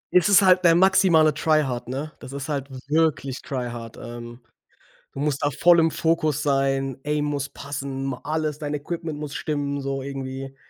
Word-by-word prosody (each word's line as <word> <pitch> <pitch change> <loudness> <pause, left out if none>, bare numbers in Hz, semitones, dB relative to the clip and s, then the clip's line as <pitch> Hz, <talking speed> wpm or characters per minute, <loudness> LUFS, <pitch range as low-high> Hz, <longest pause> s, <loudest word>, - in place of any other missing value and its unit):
Es 180 +3 +5
ist 200 0 +7
halt 185 0 +5
der 170 -1 +6
maximale 180 -4 +5
Tryhard, 145 -6 0
ne? 140 +5 -4
Das 130 - -10
ist 140 +1 -5
halt 140 -2 -3 0.2
wirklich 150 -3 0
Tryhard. 120 -4 -5
Ähm, 120 +1 -9 0.7
du 135 - -6
musst 145 -1 -1
da 145 - +2
voll 170 +5 +5
im 165 0 +4
Fokus 155 -3 0
sein, 135 -2 0
Aim 150 0 0
muss 140 -1 -2
passen, 140 -1 -5
ma 130 -2 -4
alles 155 -1 -2
dein 150 -1 -4
Equipment 160 +1 -4
muss 150 -1 -6
stimmen, 140 -2 -2
so 135 0 -2
irgendwie. 135 0 -6
145 Hz, 175 wpm, -24 LUFS, 135-155 Hz, 0.7 s, ist